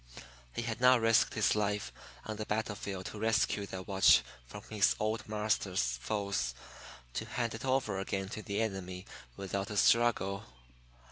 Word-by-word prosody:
He 115 - -3
had 115 0 -4
not 125 0 +7
risked 115 -1 +3
his 110 - +3
life 105 -1 -1 0.3
on 110 -1 -4
the 110 - -4
battle 110 0 -1
field 95 -2 -6
to 105 - -6
rescue 110 -2 +1
that 95 -1 -7
watch 95 -1 +6 0.2
from 105 +9 -9
his 105 -2 +3
"old 110 +1 -2
marster's" 100 - 0
foes 100 - -1 0.6
to - - -3
hand 115 -1 -2
it 110 - -7
over 130 -7 0
again 95 0 -2
to 110 - -5
the 105 +1 -1
enemy 95 -3 -4 0.3
without 100 +1 -3
a 105 - -4
struggle. 110 -4 +3
105 Hz, 160 wpm, -32 LUFS, 95-110 Hz, 0.6 s, not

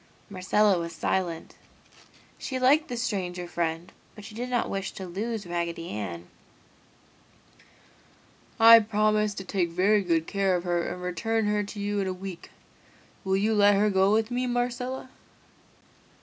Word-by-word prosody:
Marcella 195 +1 +2
was 170 0 -5
silent. 170 0 -2 0.9
She 260 - -4
liked 285 +5 +3
the 245 - -5
stranger 185 -7 -3
friend, 170 0 -3 0.2
but 210 - -11
she 220 - -10
did 245 +3 -5
not 245 -1 0
wish 195 0 -4
to 190 - -7
lose 210 +4 -4
Raggedy 170 -1 -4
Ann. 90 -5 -5 2.3
"I 230 0 +10
will 215 - -4
promise 215 -1 +1
to 195 - -6
take 180 -2 -1
very 195 +5 +2
good 165 -3 0
care 195 -1 0
of 175 - -2
her 175 -1 0
and 180 0 -6
return 225 +5 -1
her 210 0 +1
to 205 +1 -9
you 205 0 -2
in 195 - -1
a 185 - -2
week. 185 -1 -9 0.7
Will 190 0 +1
you 215 +3 +1
let 205 -1 +5
her 210 +1 +2
go 190 +1 +3
with 220 +2 +1
me, 250 +1 -1
Marcella?" 250 +2 -3
200 Hz, 160 wpm, -26 LUFS, 180-220 Hz, 2.3 s, I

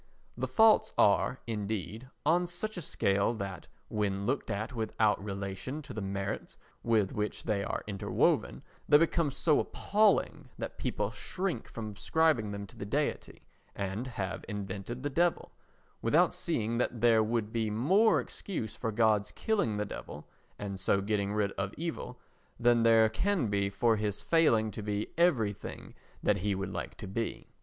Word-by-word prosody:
The - - -2
faults 220 -1 +5
are, 105 +5 +3
indeed, 110 +2 -4 0.2
on 175 +3 +3
such 195 +5 -3
a 180 - -4
scale 100 -4 +1
that, 100 -3 -6 0.2
when 100 -2 -1
looked 130 +5 -1
at 110 +6 -3
without 110 -3 +1
relation 100 +8 -5
to - - -9
the 110 - -4
merits 100 0 -4 0.2
with 110 -4 +2
which 105 0 -3
they 105 -3 0
are - - -3
interwoven, 100 -2 0 0.3
they 145 - +9
become 165 0 +2
so 150 +2 +2
appalling 210 0 +1
that - - -6
people - - -1
shrink 180 -10 -3
from 110 -2 -6
ascribing 155 -4 +2
them 100 0 -5
to - - -16
the - - -5
Deity 140 +9 -2 0.3
and 100 +5 -3
have 100 -6 -4
invented 100 +4 -5
the 145 - 0
Devil, 170 +4 +1 0.5
without - - +4
seeing 115 +2 -1
that 120 -2 -1
there 115 -2 +5
would 110 0 -1
be 115 -2 0
more 180 - +4
excuse 115 - -5
for 115 - -2
God's 110 -2 +2
killing 200 - 0
the 105 - -1
Devil, 75 -6 -8 0.3
and 100 -2 -5
so 95 +1 +2
getting 100 0 -1
rid 105 -1 0
of 95 +1 -2
evil, 155 -6 -5 0.4
than 120 -1 +4
there 115 -1 +6
can 175 - 0
be 100 -1 +1
for 110 +3 +2
his 105 -1 -2
failing 115 -10 +3
to 110 - -6
be 105 0 -2
everything 125 - 0 0.3
that 105 - +3
he 100 +1 0
would 95 0 -4
like 90 - -5
to - - -7
be. 115 +4 -4
110 Hz, 165 wpm, -31 LUFS, 100-130 Hz, 0.5 s, they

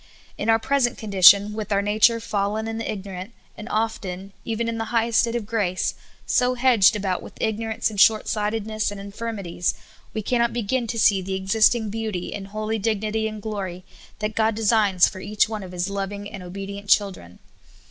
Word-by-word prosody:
In 210 - -3
our 225 - +6
present 245 +1 +1
con 215 -3 -7
dition, 200 +2 +7
with 215 0 -5
our 200 0 +2
nature 215 +3 +3
fallen 215 0 -2
and 225 0 -4
ignorant, 195 -1 -6 0.2
and 215 +3 -9
often, 195 -3 -3
even 230 0 -2
in 230 0 -3
the 225 - -2
highest 230 -1 +1
state 235 0 +1
of 235 -3 -2
grace, 200 -5 -1 0.3
so 250 0 +2
hedged 240 -5 +5
about 190 -3 -1
with - - -12
ignorance 220 0 -1
and 205 -2 +1
short 215 +1 +5
sightedness 215 0 -1
and 205 -1 -7
infirmities, 200 -4 -3 0.4
we 215 - -2
cannot 235 +1 +1
begin 240 +1 -1
to 230 - -4
see 205 -3 +4
the 190 +1 -3
existing 215 +3 +2
beauty 215 -5 -4
and 195 -1 -6
holy 215 +2 -3
dignity 220 +1 -1
and 215 -1 -7
glory 190 -4 -5 0.3
that 215 0 -3
God 220 0 +1
designs 210 -4 +3
for 190 - -7
each 205 +2 +1
one 215 -1 -5
of 185 -2 -9
His 180 +1 -2
loving 200 +1 -4
and 200 -2 -8
obedient 195 +2 -7
children. 185 - +1
210 Hz, 185 wpm, -23 LUFS, 195-225 Hz, 0.4 s, dition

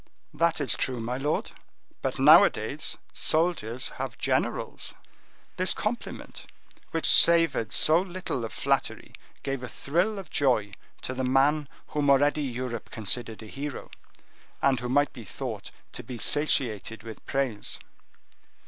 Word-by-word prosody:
"That 165 -1 +1
is 140 - +2
true, 130 -2 -2
my 120 +2 -3
lord, 145 +3 -1 0.5
but - - -2
nowadays - - +4 0.2
soldiers 155 -7 +1
have 125 -4 -5
generals." - - -2 0.6
This 185 +1 +3
compliment, 225 +3 -5 0.4
which - - -1
savored 165 -10 +5
so 160 +3 +6
little 185 -9 -4
of 115 - -5
flattery, - - -1 0.3
gave 135 -2 -3
a 125 - -5
thrill 175 - -1
of 190 -5 -8
joy 115 -7 +1 0.3
to 130 - -2
the 130 0 -3
man 140 +3 +2 0.2
whom 145 -1 0
already 145 +2 +4
Europe 125 -4 -4
considered 110 +1 -3
a - - -10
hero; 140 +5 -6 0.7
and 135 -3 +2
who 125 +1 -4
might 145 +3 +2
be 120 - -9
thought 100 - -6 0.2
to - - -7
be 125 - -8
satiated 115 -6 +1
with 115 -1 -10
praise. 130 -6 -2
135 Hz, 135 wpm, -27 LUFS, 120-150 Hz, 0.7 s, so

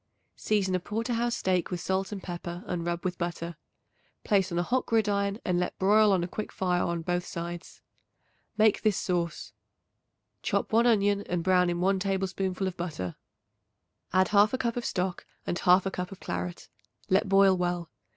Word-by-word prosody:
Season 200 -3 0
a 185 - +2
porter 225 +6 -3
house 235 +1 0
steak 185 -2 0
with 180 -2 -3
salt 190 +3 -1
and 200 -2 -6
pepper 175 0 -6
and 175 -1 -3
rub 175 +1 -2
with 180 -1 -2
butter. 170 -1 -3 0.7
Place 195 -3 +2
on 170 - -2
a 175 - +2
hot 250 +7 0
gridiron 205 -3 +1
and 180 -2 +1
let 180 - -2
broil 210 +2 +5
on 185 -3 +2
a - - -2
quick 215 +4 -5
fire 180 -2 0
on 170 -1 -1
both 175 +1 -1
sides. 170 0 -7 0.7
Make 215 -1 +4
this 215 -4 +2
sauce: 175 -2 -2 0.9
Chop - - -1
1 230 +2 +5
onion 205 -3 +3
and 175 -1 -1
brown 180 -1 +3
in 175 0 -1
1 190 +1 +2
tablespoonful 190 0 -1
of 185 -2 -3
butter; 150 - -4 1.0
add 185 +1 +3
1/2 210 +4 +4
cup 235 -2 -1
of 245 - -3
stock 185 -1 -2 0.2
and 175 - -2
1/2 185 +1 +4
cup 180 +1 -4
of 195 - -10
claret; 180 0 -5 0.4
let 190 +1 +3
boil 195 -1 +6
well. 175 -2 -2
185 Hz, 180 wpm, -28 LUFS, 175-200 Hz, 1.0 s, boil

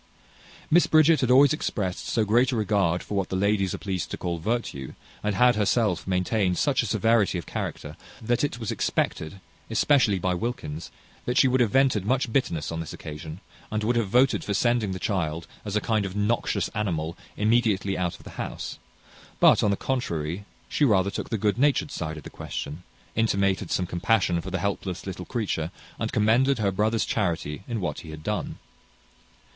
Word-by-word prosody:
Miss 175 +3 +5
Bridget 155 -1 +5
had 130 - +1
always 135 +2 +6
exprest 95 -11 -3
so 110 -2 +1
great 120 +6 +3
a - - -1
regard 100 -6 +1
for - - -7
what 95 -3 0
the - - -2
ladies 100 -1 +1
are - - -5
pleased 95 -4 -3
to - - -5
call 85 -1 -3
virtue, 85 - -3 0.3
and 105 -1 -1
had 125 +4 +5
herself 105 -5 +1
maintained 90 0 +1
such 145 -2 +2
a 115 - -3
severity 110 -2 +2
of 85 - -5
character, - - -5 0.2
that 120 +3 0
it 145 -4 -1
was 115 -3 -3
expected, 80 +5 -1 0.3
especially 130 -9 +3
by 90 0 0
Wilkins, 85 -6 -4 0.4
that 125 +1 -1
she 130 - +6
would 130 0 +2
have 115 - +3
vented 130 -4 +3
much 125 +1 0
bitterness 85 - 0
on 80 - -3
this 80 - -6
occasion, 80 +3 -8 0.3
and 110 0 -2
would 120 +3 +1
have 115 -3 +1
voted 125 +5 +3
for 100 - -2
sending 120 -2 +2
the 95 - -3
child, 85 -4 -2 0.2
as 105 -1 -4
a - - +4
kind 110 -1 +1
of 95 -1 -5
noxious 105 +3 0
animal, 85 -6 -2 0.2
immediately 105 -3 +2
out 90 -1 -1
of - - -17
the - - -10
house; - - -6 0.6
but, - - +6
on 105 - +3
the 100 - +1
contrary, 90 - -2 0.2
she - - 0
rather 100 -7 +3
took - - -5
the 115 - -1
good 105 +1 0
natured 145 +1 +2
side 80 -1 -4
of 75 - -9
the - - -9
question, 75 +5 -6 0.3
intimated 100 -4 +1
some 90 - 0
compassion 90 0 +1
for 95 - -6
the 95 - -1
helpless 95 -1 -3
little 90 -2 -6
creature, 100 -9 -2 0.3
and - - -2
commended 120 +6 +3
her 100 -3 +1
brother's 110 +4 +1
charity 85 -6 -1
in 115 -2 -2
what 90 - -3
he 80 - -10
had 80 0 -9
done. - - -3
100 Hz, 195 wpm, -26 LUFS, 90-120 Hz, 0.6 s, always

